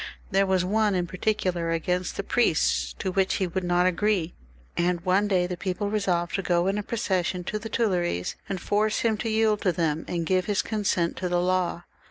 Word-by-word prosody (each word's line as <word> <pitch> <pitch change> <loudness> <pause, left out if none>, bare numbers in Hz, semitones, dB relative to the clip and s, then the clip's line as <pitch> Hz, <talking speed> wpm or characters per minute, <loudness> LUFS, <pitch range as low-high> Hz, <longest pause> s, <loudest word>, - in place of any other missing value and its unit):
There 195 0 +3
was 185 -1 +2
one 210 +1 +2
in 180 -1 0
particular 185 -2 -1
against 180 +2 -1
the 200 - -2
priests 195 -7 +1
to 190 - -2
which 190 0 +1
he 190 - 0
would 185 +1 -3
not 175 0 +2
agree, 185 -1 +1 0.4
and 175 0 +1
one 190 +3 +2
day 185 -3 +2
the 180 0 -3
people 190 +3 -3
resolved 180 -5 0
to 195 - 0
go 175 -1 +1
in 195 +2 +1
a - - -1
procession 185 -5 -1
to 215 +4 -3
the 225 +1 -7
Tuileries 175 - 0
and 190 - -2
force 210 +3 +1
him 225 -2 +2
to 225 - -2
yield 220 -1 +2
to 185 - +2
them, 160 -2 -1
and 170 -2 -2
give 185 +1 +1
his 205 -2 0
consent 195 -6 0
to 180 - -2
the 175 0 +1
law. 180 -1 0
185 Hz, 210 wpm, -26 LUFS, 175-205 Hz, 0.4 s, There